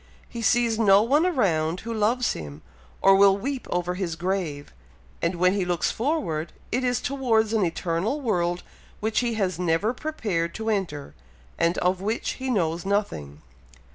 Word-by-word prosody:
He 235 - -7
sees 230 -1 +2
no 200 -2 +6
one 290 +9 +3
around 175 - +1
who 230 +1 -5
loves 225 +3 +1
him, 75 -1 -8 0.4
or 195 - +7
will 195 0 +6
weep 265 +5 -4
over 180 0 -1
his 180 -3 -3
grave; 170 -5 -3 0.5
and 170 +2 0
when 180 +2 +3
he 200 -2 0
looks 175 -2 0
forward, 195 - -2 0.2
it 250 +2 0
is 245 -1 +1
towards 230 -5 +1
an 220 -3 +2
eternal 170 - -1
world 175 -9 -1 0.4
which 215 0 0
he 240 -2 -1
has 185 -5 -1
never 180 +6 +1
prepared 210 - -2
to 220 0 -2
enter, 160 - -3 0.5
and 170 +1 +2
of 180 +1 +1
which 215 +4 -1
he 260 - -2
knows 170 -7 0
nothing." 80 - -2
195 Hz, 165 wpm, -25 LUFS, 170-230 Hz, 0.5 s, or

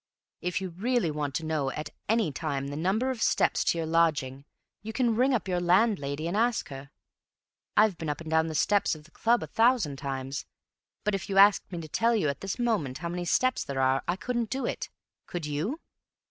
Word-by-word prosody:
If 180 +1 -1
you 190 - -3
really 220 0 0
want 145 -2 -3
to 160 - -2
know 155 -4 0
at 150 +3 -5 0.2
any 225 -7 +2
time 140 -1 -3
the 145 - -5
number 195 - +1
of 245 -4 -6
steps - - +2
to - - +2
your 165 - -1
lodging, 155 -5 +1 0.4
you 220 +1 -6
can 235 -2 +1
ring 255 +4 +3
up 235 -6 0
your 180 -1 0
landlady 175 -6 +2
and 175 - -2
ask 230 +1 +1
her. 135 0 -9 0.9
I've 210 -4 +4
been 160 - -3
up 145 - -2
and 165 - -9
down 160 0 +3
the 160 - -4
steps 205 +3 +2
of 155 - -13
the 165 - -20
club 235 +6 +2
a - - -3
thousand 225 - +2
times, 135 0 -4 0.6
but 210 - 0
if 195 -1 -3
you 195 - -1
asked 200 0 +6
me 175 - -4
to 160 - -8
tell 230 +9 +2
you 185 -9 +1
at 140 - -4
this 195 0 -3
moment 210 - 0
how 170 +3 -4
many 175 0 -3
steps 255 +8 +2
there 140 -1 -4
are 130 0 +3
I 175 - +1
couldn't 235 +2 -2
do 265 +1 -2
it. - - -3 0.4
Could 175 -3 -4
you?" 165 - -3
175 Hz, 220 wpm, -28 LUFS, 150-220 Hz, 0.9 s, asked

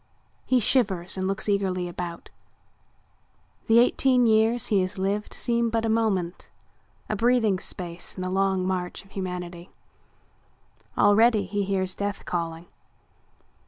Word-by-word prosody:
He 255 - +4
shivers 195 -7 +1
and 190 -1 -2
looks 195 +3 -2
eagerly 190 -3 0
about. 175 -1 -7 1.4
The 225 - +5
eighteen 250 +1 +4
years 225 +1 +3
he 200 -3 +3
has 185 +2 -3
lived 200 +2 -1
seem 235 -1 0
but 225 0 0
a - - 0
moment, 200 -6 -1 0.6
a 215 - -1
breathing 225 -3 +2
space 175 -2 -5
in 185 - -4
the 185 - -3
long 190 -1 +1
march 185 +1 -3
of 195 - -22
humanity. 180 -2 -6 1.3
Already 215 0 +4
he 205 +2 -2
hears 190 -1 -1
death 200 0 -4
calling. 165 -1 -3
195 Hz, 130 wpm, -25 LUFS, 185-220 Hz, 1.4 s, The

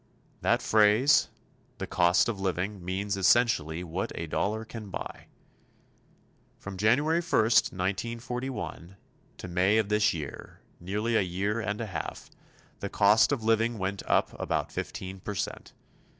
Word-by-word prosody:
That - - +2
phrase, 110 +6 +4 0.5
"the - - -4
cost 90 +1 +3
of 115 -4 -3
living," 95 +1 -2
means 100 +3 -2
essentially 95 -5 +2
what 90 +2 -3
a 85 - -4
dollar 105 +7 -2
can 110 -2 -8
buy. - - -7 1.3
From 100 0 -8
January 140 - +2
1, 175 - -12
1941, 110 -2 -1 0.4
to - - -7
May 90 +4 +2
of 110 -2 +1
this 105 0 +3
year, 75 -4 -7 0.2
nearly 105 +6 -2
a - - +4
year 100 +4 -1
and 105 -2 -3
a 115 - -2
half, 90 -8 -6 0.5
the - - -4
cost 105 +5 +4
of 130 -6 -1
living 115 +1 +2
went 95 0 -3
up - - +3
about - - -1
15 95 0 -5
percent. 100 +1 -5
105 Hz, 135 wpm, -28 LUFS, 95-115 Hz, 1.3 s, phrase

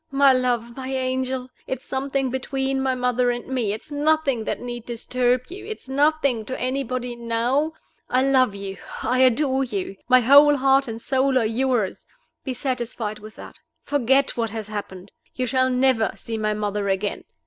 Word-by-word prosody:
My 275 -1 +5
love! 240 -2 0
my 260 -1 -6
angel! 260 -1 -2 0.2
it's 260 -1 -4
something 270 -1 -1
between 265 +1 -1
my 265 -1 +1
mother 250 0 +1
and 240 0 -2
me; 250 -6 -1
it's 220 +8 -7
nothing 290 -5 +1
that - - -2
need 240 -1 -6
disturb 245 +1 0
you; 375 +4 -8
it's 435 -10 -7
nothing 280 -3 +2
to 260 - -5
anybody 255 -1 -2
now. 235 +6 0 0.4
I 255 +1 +2
love 260 -5 +3
you, 195 -1 -6 0.3
I 250 +3 +1
adore 265 +1 +3
you; 195 -5 -4
my 255 0 +7
whole 285 +4 +7
heart 270 0 +3
and 225 -1 -5
soul 265 +2 +1
are 235 - +2
yours. 235 -2 -1 0.4
Be 260 - -4
satisfied 240 -5 -3
with 215 +1 -12
that. - - -12 0.2
Forget 270 0 +2
what 230 -2 -1
has 215 -1 -6
happened. 200 -2 -7 0.2
You 255 - -1
shall 260 +1 +2
never 255 -3 +2
see 230 - -6
my 215 -1 -1
mother 205 -1 -2
again. 195 +1 -1
255 Hz, 170 wpm, -23 LUFS, 230-270 Hz, 0.4 s, my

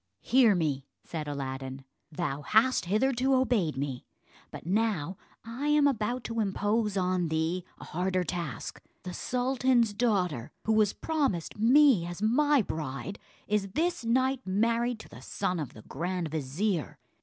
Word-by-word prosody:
"Hear 240 -5 +5
me," 145 -5 -1 0.2
said 155 -3 -5
Aladdin; 135 -1 -5 0.3
"thou 150 -3 -3
hast 220 - +3
hitherto 260 +7 +2
obeyed 225 - +1
me, 135 -2 -3 0.5
but - - -10
now 195 -3 0 0.3
I 240 +6 -4
am 295 -1 +4
about 245 -2 0
to 230 0 -3
impose 210 +1 0
on 180 -2 +1
thee 160 +3 -1
a - - -11
harder 185 +2 -1
task. 170 - -5 0.2
The 180 -1 -6
sultan's 250 -2 +1
daughter, 185 - 0 0.2
who 220 - +2
was 215 -2 +4
promised 270 - -1
me 245 - +5
as 175 +1 -6
my 275 +5 +3
bride, 155 +4 -5 0.3
is 210 -1 +1
this 340 -3 0
night 260 +3 +2
married 230 +5 +1
to - - -13
the 125 - -12
son 180 +5 -2
of 145 -5 -5
the 110 - -12
grand 175 +2 -3
vizier. 155 +2 -2
200 Hz, 145 wpm, -29 LUFS, 160-240 Hz, 0.5 s, Hear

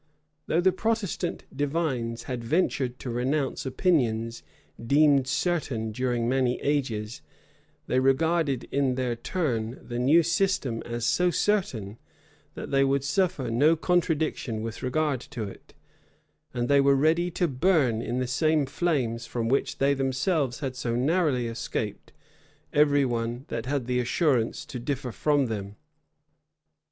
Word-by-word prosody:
Though 165 - +2
the 190 +1 +4
Protestant 205 -3 -2
divines 135 -6 -1
had 125 -2 -5
ventured 130 -3 0
to 125 - -6
renounce 130 +3 -1
opinions 120 - 0 0.4
deemed 140 +1 +4
certain 140 -7 -1
during 120 0 -1
many 125 -1 +1
ages, 120 -7 -1 0.6
they 130 - +1
regarded, 140 0 +2
in 135 -2 +1
their 125 -2 -1
turn, 120 -4 -2
the 120 0 -6
new 150 +7 +5
system 170 - 0
as 120 0 -3
so 180 +8 +3
certain, 150 - -1 0.6
that - - -7
they 135 0 +4
would 135 0 +1
suffer 145 -5 0
no 145 +8 +4
contradiction 160 -9 0
with 115 0 -6
regard 140 +1 0
to 115 -1 -7
it; 100 - -10 0.8
and 120 -1 -2
they 140 +1 +5
were 140 0 +4
ready 160 +5 +2
to 175 0 0
burn 135 -5 +2
in 120 +2 -3
the 130 - 0
same 150 +4 +2
flames 130 -6 -1
from 115 -2 -2
which 135 - 0
they 140 +1 +3
themselves 135 +1 0
had 135 -3 -3
so 120 -3 -2
narrowly 140 -1 +1
escaped, 115 -2 -4 0.6
every 145 -1 +4
one 120 +1 -2
that 115 +1 -4
had 140 -2 -1
the 125 0 0
assurance 125 -1 +1
to 125 - -7
differ 130 0 -3
from 145 +3 +1
them. 100 -3 -5
135 Hz, 140 wpm, -27 LUFS, 120-155 Hz, 0.8 s, new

